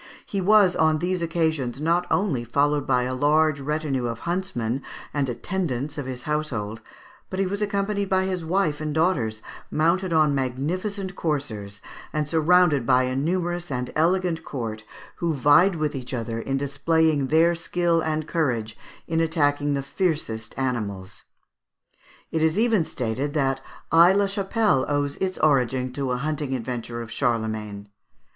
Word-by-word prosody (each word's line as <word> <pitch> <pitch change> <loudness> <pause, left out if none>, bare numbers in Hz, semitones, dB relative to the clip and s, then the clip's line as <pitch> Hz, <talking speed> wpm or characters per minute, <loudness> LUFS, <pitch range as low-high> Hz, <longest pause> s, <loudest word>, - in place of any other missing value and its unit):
He 195 - -2
was 200 -1 +5
on 155 -1 +3
these 180 +2 -1
occasions 160 -7 -1
not 170 +3 +1
only 170 - +1
followed 145 +4 +1
by 125 0 +3
a 130 +1 -2
large 150 +2 +2
number 140 -4 -1
of 115 0 -6
huntsmen 170 -9 -2 0.3
and 140 -3 0
attendants 145 0 -3
of 145 -4 -5
his 125 -1 -6
household, 120 -9 -3 0.5
but 185 - -5
he 195 - +2
was 200 +2 -3
accompanied 200 -1 -1
by 190 0 +2
his 185 -2 -2
wife 160 -3 0
and 155 -1 -3
daughters, 130 -11 +1 0.3
mounted 170 +4 +1
on 155 -3 +4
magnificent 180 - -2
coursers, 110 -11 -3 0.3
and 150 -1 -1
surrounded 160 -2 +4
by 130 +1 +4
a 130 0 -1
numerous 175 +4 -1
and 125 -2 -3
elegant 170 0 +1
court, 115 -7 -5 0.3
who 170 -2 -1
vied 150 +8 +5
with 155 -2 -1
each 130 0 -5
other 115 -1 -3
in 135 +4 -2
displaying 145 +1 +1
their 165 +4 +4
skill 170 0 0
and 155 -1 -2
courage 120 -9 -1 0.3
in 165 0 0
attacking 145 -3 +1
the 140 - -2
fiercest 140 - -2
animals. 105 -8 -3 1.1
It 160 - 0
is 160 +3 +2
even 220 -6 +3
stated 130 +4 -3
that 135 -2 +1 0.3
Aix 175 +4 +7
la 200 - +3
Chapelle 200 - +1
owes 145 -1 0
its 185 -1 -2
origin 130 -3 +2
to 135 -1 -2
a 125 - 0
hunting 145 0 -2
adventure 120 -1 -4
of 110 - -11
Charlemagne. 110 -5 -2
150 Hz, 155 wpm, -24 LUFS, 130-170 Hz, 1.1 s, Aix